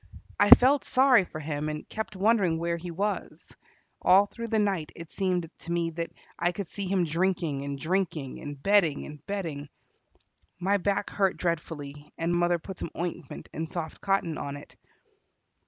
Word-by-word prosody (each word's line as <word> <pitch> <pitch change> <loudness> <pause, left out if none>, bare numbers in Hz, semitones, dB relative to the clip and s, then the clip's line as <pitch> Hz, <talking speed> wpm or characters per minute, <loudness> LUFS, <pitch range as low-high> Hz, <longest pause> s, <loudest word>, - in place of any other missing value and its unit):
I 205 - +5
felt 270 +3 +8
sorry 255 -6 +5
for 155 - -8
him, 150 0 -3
and 150 0 -5
kept 220 -2 -5
wondering 195 -4 +3
where 170 +1 -1
he 175 +1 -7
was. 200 +5 -4 0.5
All 195 +2 +6
through 230 +3 -7
the 225 -1 0
night 195 -7 0
it 170 -1 -10
seemed 180 -4 -1
to 170 - -6
me 170 -1 0
that 165 +1 -4 0.3
I 175 +1 +2
could 200 - -4
see 195 +3 -5
him 185 -1 +2
drinking 165 -3 0
and 140 0 -4
drinking, 165 -5 -2
and 145 -1 -7
betting 195 -8 +3
and 150 -1 -10
betting. 160 -8 -4 0.9
My 195 +3 +2
back 200 +1 -1
hurt 195 -2 +1
dreadfully, 150 -4 -4
and 170 +1 0
mother 175 0 +3
put 185 +2 -9
some - - -4
ointment 175 -4 -5
and 160 0 -4
soft 160 -2 -5
cotton 195 -5 0
on 140 0 -4
it. 145 - -13
175 Hz, 170 wpm, -28 LUFS, 155-195 Hz, 0.9 s, felt